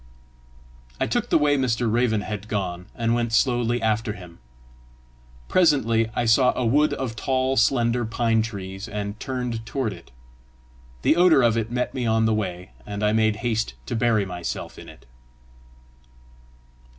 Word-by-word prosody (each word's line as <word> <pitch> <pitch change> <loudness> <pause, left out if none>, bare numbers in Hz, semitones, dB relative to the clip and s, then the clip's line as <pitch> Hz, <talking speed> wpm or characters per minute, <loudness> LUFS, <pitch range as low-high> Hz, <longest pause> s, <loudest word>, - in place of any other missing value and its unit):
I - - +1
took - - -1
the - - +4
way 145 -1 +3
Mr. 120 -3 0
Raven 110 -1 +1
had 105 0 -6
gone, 90 -4 -3
and 115 0 0
went 120 -1 -1
slowly 120 -1 +2
after 110 0 0
him. 90 -4 -12 1.1
Presently 115 -10 +3
I 120 - 0
saw 125 +3 +4
a 125 - -1
wood 145 +6 +3
of 125 -4 -4
tall 130 +3 0
slender 120 -1 +2
pine 115 0 +1
trees, 95 -3 -6
and 105 0 -5
turned 125 -4 -3
toward 115 -1 -2
it. - - -14 0.9
The - - +4
odour 175 -6 +5
of 115 -2 +3
it 115 -1 -1
met 125 +1 -2
me 125 -3 -2
on 110 0 +2
my 110 - +2
way, 90 -4 -3
and 105 0 -5
I 105 0 +2
made 110 -1 +2
haste 110 - -1
to - - -3
bury 115 -3 +2
myself 90 -2 -6
in - - -11
it. - - -16
115 Hz, 160 wpm, -24 LUFS, 105-125 Hz, 1.1 s, odour